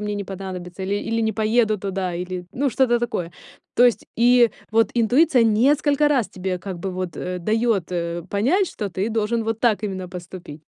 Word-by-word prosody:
мне 210 Hz, 0 st, -3 dB
не 200 Hz, -1 st, -4 dB
понадобится". 185 Hz, -1 st, -7 dB
Или 200 Hz, +1 st, -1 dB
или: 230 Hz, +2 st, -1 dB
"Не 220 Hz, -1 st, +1 dB
поеду 220 Hz, 0 st, +2 dB
туда". 190 Hz, -2 st, -3 dB
Или, 180 Hz, 0 st, -5 dB
ну, 275 Hz, +1 st, 0 dB
что-то 240 Hz, 0 st, +2 dB
такое. 225 Hz, -8 st, -3 dB, 0.5 s
То 245 Hz, -, +6 dB
есть 240 Hz, -, +2 dB
и 240 Hz, 0 st, +5 dB, 0.2 s
вот 225 Hz, +1 st, +3 dB
интуиция 245 Hz, +3 st, +4 dB
несколько 285 Hz, +6 st, +3 dB
раз 260 Hz, -7 st, +1 dB
тебе 185 Hz, -1 st, -3 dB
как 185 Hz, -1 st, -6 dB
бы 190 Hz, +1 st, -4 dB
вот, 185 Hz, -1 st, -4 dB
э, 180 Hz, 0 st, -4 dB
дает, 215 Hz, -2 st, 0 dB
э, 170 Hz, 0 st, -2 dB
понять, 295 Hz, -, +2 dB
что 205 Hz, -2 st, -4 dB
ты 195 Hz, +5 st, -2 dB
должен 225 Hz, +1 st, 0 dB
вот 225 Hz, 0 st, -2 dB
так 215 Hz, -4 st, +2 dB
именно 185 Hz, -3 st, -4 dB
поступить. 175 Hz, -4 st, -9 dB
210 Hz, 190 wpm, -22 LUFS, 185-235 Hz, 0.5 s, То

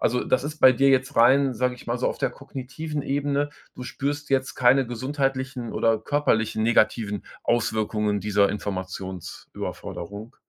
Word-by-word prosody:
also, 125 Hz, +1 st, +1 dB
das 130 Hz, -, +1 dB
ist 150 Hz, +2 st, -5 dB
bei 130 Hz, -, +8 dB
dir 135 Hz, +2 st, +3 dB
jetzt 130 Hz, -1 st, +2 dB
rein, 130 Hz, +3 st, +5 dB
sage 125 Hz, +2 st, 0 dB
ich -, -, -15 dB
mal 120 Hz, +1 st, -1 dB
so, -, -, +1 dB
auf -, -, -4 dB
der -, -, 0 dB
kognitiven 140 Hz, +3 st, -6 dB
Ebene. 145 Hz, +1 st, -1 dB, 0.2 s
Du 125 Hz, -, -8 dB
spürst 145 Hz, +3 st, -3 dB
jetzt 135 Hz, -1 st, 0 dB
keine 130 Hz, +2 st, +5 dB
gesundheitlichen 130 Hz, 0 st, -2 dB
oder 115 Hz, -1 st, +2 dB
körperlichen 110 Hz, -4 st, 0 dB
negativen 110 Hz, -2 st, +2 dB, 0.2 s
Auswirkungen 110 Hz, -2 st, 0 dB
dieser 100 Hz, -1 st, +2 dB
Informationsüberforderung? 95 Hz, +2 st, -6 dB
125 Hz, 150 wpm, -25 LUFS, 110-135 Hz, 0.2 s, bei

